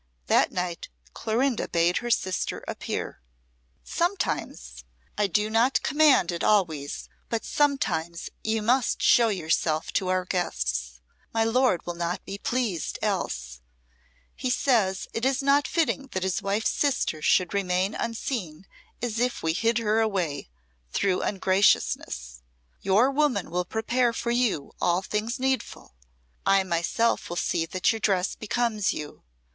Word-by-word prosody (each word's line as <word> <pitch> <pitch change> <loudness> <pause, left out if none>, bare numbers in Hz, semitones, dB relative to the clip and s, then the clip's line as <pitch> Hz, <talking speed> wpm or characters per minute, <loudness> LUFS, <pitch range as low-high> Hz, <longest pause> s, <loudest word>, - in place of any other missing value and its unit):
That - - +3
night 180 -2 -4 0.2
Clorinda 240 +2 0
bade 170 +1 +2
her 240 - -3
sister 185 -5 -1
appear. - - -4 0.6
"Sometimes 65 - -2 0.3
I 205 -1 +1
do 210 +3 +1
not 230 +4 +2
command 290 - +4
it 170 - -4
always 160 -9 +1 0.2
but 230 -2 -2
sometimes 180 - 0 0.2
you 220 0 0
must 245 +2 +1
show 235 -1 +6
yourself 160 -5 0
to 190 - 0
our 185 0 +1
guests. 65 - -2 0.3
My 225 - +3
lord 225 -4 +2
will 175 - -3
not 170 +1 -3
be 200 +1 -6
pleased 230 -10 -2
else. 60 0 -2 0.7
He 255 - -3
says 220 -7 +1
it 230 - -3
is 270 +1 +1
not 280 +1 +3
fitting 310 -4 0
that 185 - -1
his 190 -2 -1
wife's 200 +3 0
sister 265 - 0
should 180 +4 +2
remain 190 0 0
unseen 215 - -4 0.4
as 230 -2 -2
if 245 0 -1
we 160 0 +1
hid 225 +5 +1
her 220 -1 +1
away 180 - -1 0.4
through 185 - +1
ungraciousness. 185 - +1 0.4
Your 215 +8 +3
woman 275 - +1
will 180 +1 -1
prepare 235 +4 0
for 235 +1 -2
you 235 - 0
all 175 +2 +2
things 220 +6 -2
needful. 260 - -2 0.5
I 195 0 +4
myself 180 +6 0
will 175 - -4
see 165 -1 0
that 185 +5 +1
your 225 - -4
dress 190 -3 +1
becomes 215 -2 0
you. 150 - -8
200 Hz, 140 wpm, -26 LUFS, 175-235 Hz, 0.7 s, show